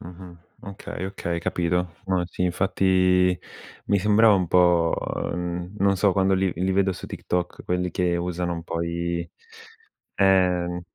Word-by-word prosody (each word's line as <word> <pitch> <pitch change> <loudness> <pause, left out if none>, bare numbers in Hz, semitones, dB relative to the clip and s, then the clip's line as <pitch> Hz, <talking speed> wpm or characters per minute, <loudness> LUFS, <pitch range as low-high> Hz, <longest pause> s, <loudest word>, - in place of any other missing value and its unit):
Mh-mh. 90 +1 -11 0.3
Okay, 100 -2 -7
okay, 85 -3 -3
capito. 90 +1 0 0.2
No, 90 -2 0
sì, 90 - -5
infatti, 90 0 +2 0.5
mi 100 - +2
sembrava 105 +2 +5
un 90 -3 +1
po', 85 -2 +4 0.4
mhmm, 90 +2 -4
non 100 0 +2
so 100 0 +3
quando 95 0 +2
li 95 -1 +1
li 95 +3 -1
vedo 95 0 +2
su 90 - -9
TikTok 90 -1 -4
quelli 90 0 -1
che 90 -1 0
usano 90 0 -2
un 85 -1 -5
po' 85 0 -3
i 85 0 -3 0.9
ehm, 90 -2 +2
90 Hz, 150 wpm, -24 LUFS, 85-95 Hz, 0.9 s, sembrava